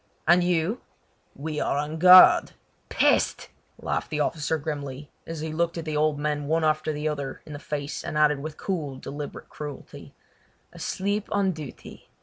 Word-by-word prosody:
"And 175 +1 +5
you?" 180 +5 0 0.5
"We 150 +1 -4
are 140 - 0
on 150 +2 -3
guard!" 180 +1 +8 0.4
"Peste!" - - +2 0.3
laughed - - -3
the 150 - -3
officer 150 +1 0
grimly, 145 -2 -6 0.2
as 165 -2 -5
he 160 0 -4
looked 170 +1 -1
at 165 - -5
the 155 -1 -3
old 150 0 +2
men 145 -1 -2
one 160 +2 +1
after 155 0 +1
the 150 0 -3
other 140 -3 -4
in 150 - -9
the 145 - -7
face 145 0 -5
and 150 - -4
added 150 -2 +3
with 155 +2 -7
cool 155 -8 -3
deliberate 145 +2 -7
cruelty: 150 -2 -9 0.6
"Asleep 200 +2 -3
on 200 -2 +2
duty! 155 -5 -10
155 Hz, 165 wpm, -25 LUFS, 145-165 Hz, 0.6 s, guard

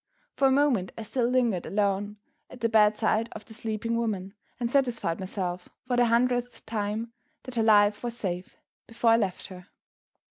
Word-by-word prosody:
For 275 - +3
a - - +3
moment 260 -9 +2
I 225 - -5
still 235 +2 0
lingered 240 -8 +1
alone 205 0 0 0.3
at 250 - -13
the 230 - +2
bedside 215 +1 +3
of 215 - -9
the 220 - -12
sleeping 225 0 -3
woman, 205 -5 -2 0.3
and 240 -1 -2
satisfied 245 -11 +1
myself 185 -2 -4 0.2
for 250 -1 0
the 245 0 +4
hundredth 245 +1 0
time 220 +1 -3 0.3
that 255 - -8
her 235 - +1
life 210 -1 +4
was 235 -1 -4
safe, 180 -4 -4 0.3
before 230 0 +2
I 225 - +6
left 195 -5 -2
her. 180 -1 -11
225 Hz, 175 wpm, -27 LUFS, 205-240 Hz, 0.3 s, I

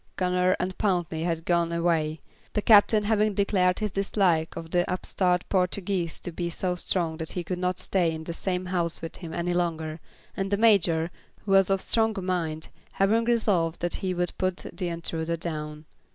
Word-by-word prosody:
Gunner 180 0 +2
and 185 +1 -2
Pountney 175 -5 0
had 165 -1 -2
gone 170 -1 +2
away, 165 -2 0 0.3
the 210 - +1
Captain 210 0 +6
having 210 -1 +2
declared 185 -2 +2
his 210 -2 -2
dislike 185 -4 +1
of 165 -1 -7
the 175 -1 +3
upstart 180 -1 0
Portuguese 180 -2 -1
to 175 - -5
be 170 +1 -3
so 180 +2 -1
strong 170 -2 -1
that 160 -1 -4
he 180 - -3
could 180 +1 -4
not 180 0 0
stay 175 -4 +1
in 160 0 -5
the 170 - -5
same 180 +1 -2
house 175 -3 -1
with 165 - -6
him 170 -3 -8
any 175 +1 -1
longer, 160 -2 -2 0.4
and 195 0 -2
the 200 - +1
Major, 175 -7 +3 0.3
who 200 - -2
was 195 -1 +5
of 195 -1 +2
stronger 220 -4 +1
mind, 165 -4 -2 0.2
having 220 +4 +2
resolved 200 -9 +1
that 175 0 -1
he 185 -1 -2
would 175 0 -2
put 185 -1 -1
the 180 - -3
intruder 165 0 -2
down. 150 -2 -5
180 Hz, 185 wpm, -26 LUFS, 165-195 Hz, 0.4 s, Captain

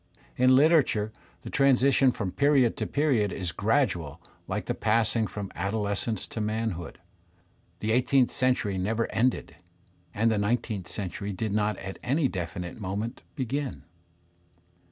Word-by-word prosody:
In 130 - +4
Uterature 130 -6 +4 0.3
the - - -7
transition 135 0 +4
from 105 -6 -2
period 140 -2 +3
to - - -2
period 130 -9 +1
is 90 -2 -3
gradual 100 - 0 0.3
like - - -3
the - - -1
passing 110 0 +1
from 100 -2 -6
adolescence 100 +2 -2
to 110 - -4
manhood; 105 -5 -3 0.8
the 110 - 0
eighteenth 125 +2 +3
centuiy 125 -7 0
never 110 +5 0
ended, 110 -9 0 0.5
and 115 +5 +1
the 110 - +1
nineteenth 105 -2 -1
century 100 0 -4
did 105 +2 -3
not 105 0 +1
at 95 0 -7
any 140 +3 +1
definite 90 -1 -5
moment 105 +5 -4 0.2
b^in. 135 - -3
110 Hz, 135 wpm, -27 LUFS, 100-130 Hz, 0.8 s, In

